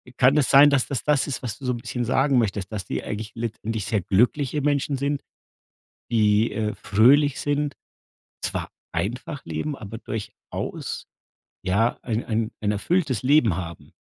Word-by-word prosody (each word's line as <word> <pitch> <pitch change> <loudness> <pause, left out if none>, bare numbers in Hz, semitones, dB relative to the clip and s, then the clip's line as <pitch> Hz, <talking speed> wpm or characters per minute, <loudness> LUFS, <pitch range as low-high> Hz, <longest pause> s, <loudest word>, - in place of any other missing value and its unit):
Kann 135 +3 +4
es 140 - +3
sein, 145 +2 +8
dass 140 -3 +2
das 140 -4 -2
das 150 -2 +2
ist, 135 - -3
was 110 -4 -4
du 135 - -8
so 125 - +1
bisschen 120 +1 -3
sagen 135 +2 +2
möchtest, 100 -3 0
dass 100 -4 -4
die - - -3
eigentlich 105 +1 -5
letztendlich 115 -2 -3
sehr 105 -4 0
glückliche 125 - +1
Menschen 145 0 +1
sind, 140 +1 -1 0.9
die, 110 0 +3
äh, 110 -1 -1
fröhlich 130 +7 +4
sind, 145 0 -1 0.7
zwar - - -2 0.2
einfach 120 - -3
leben, 150 -2 -3
aber 110 +1 -8
durchaus 110 -3 -6 0.6
ja, 110 +6 +2
ein 115 -1 -2
ein 110 -1 -1
ein 105 -1 +1
erfülltes 135 - 0
Leben 125 - +4
haben? 85 -3 -7
120 Hz, 160 wpm, -24 LUFS, 110-140 Hz, 0.9 s, sein